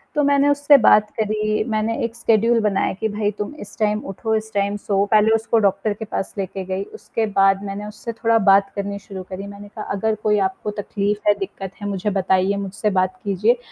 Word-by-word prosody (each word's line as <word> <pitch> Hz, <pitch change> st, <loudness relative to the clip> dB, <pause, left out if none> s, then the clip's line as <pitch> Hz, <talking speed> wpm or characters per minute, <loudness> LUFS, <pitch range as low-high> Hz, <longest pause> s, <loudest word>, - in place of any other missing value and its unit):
तो 295 Hz, -, +2 dB
मैंने 285 Hz, 0 st, +3 dB
उससे 285 Hz, 0 st, +5 dB
बात 210 Hz, 0 st, +6 dB
करी 215 Hz, 0 st, 0 dB
मैंने 220 Hz, +1 st, 0 dB
एक 230 Hz, 0 st, -3 dB
स्केड्यूल 230 Hz, 0 st, +3 dB
बनाया 205 Hz, -2 st, +1 dB
कि 220 Hz, -, 0 dB
भई 205 Hz, 0 st, -1 dB
तुम 210 Hz, +7 st, -4 dB
इस 205 Hz, -, -11 dB
टाइम 210 Hz, -1 st, +1 dB
उठो 220 Hz, +3 st, -3 dB
इस 220 Hz, 0 st, -3 dB
टाइम 200 Hz, 0 st, 0 dB
सो। 200 Hz, -1 st, 0 dB
पहले 215 Hz, 0 st, +5 dB
उसको 225 Hz, +1 st, +1 dB
डॉक्टर 200 Hz, +2 st, +1 dB
के 220 Hz, +2 st, -7 dB
पास 195 Hz, -, -4 dB
लेके 190 Hz, 0 st, -4 dB
गई 190 Hz, +1 st, -3 dB
उसके 220 Hz, +2 st, -2 dB
बाद 195 Hz, 0 st, +4 dB
मैंने 205 Hz, +1 st, -5 dB
उससे 215 Hz, +2 st, -7 dB
थोड़ा 230 Hz, 0 st, +2 dB
बात 195 Hz, 0 st, +5 dB
करनी 200 Hz, 0 st, -3 dB
शुरू 190 Hz, -2 st, -8 dB
करी 195 Hz, +1 st, -6 dB
मैंने 200 Hz, 0 st, -10 dB
कहा 210 Hz, +1 st, -8 dB
अगर 220 Hz, +2 st, 0 dB
कोई 210 Hz, -1 st, +3 dB
आपको 190 Hz, +2 st, -6 dB
तकलीफ़ 205 Hz, +1 st, -2 dB
है 205 Hz, -, +7 dB
दिक्कत 195 Hz, -1 st, -6 dB
है 205 Hz, -, -3 dB
मुझे 200 Hz, 0 st, -2 dB
बताइए 190 Hz, +1 st, +2 dB
मुझसे 200 Hz, +2 st, -2 dB
बात 185 Hz, +6 st, -1 dB
कीजिए। 210 Hz, +4 st, +2 dB
205 Hz, 210 wpm, -21 LUFS, 195-220 Hz, -, है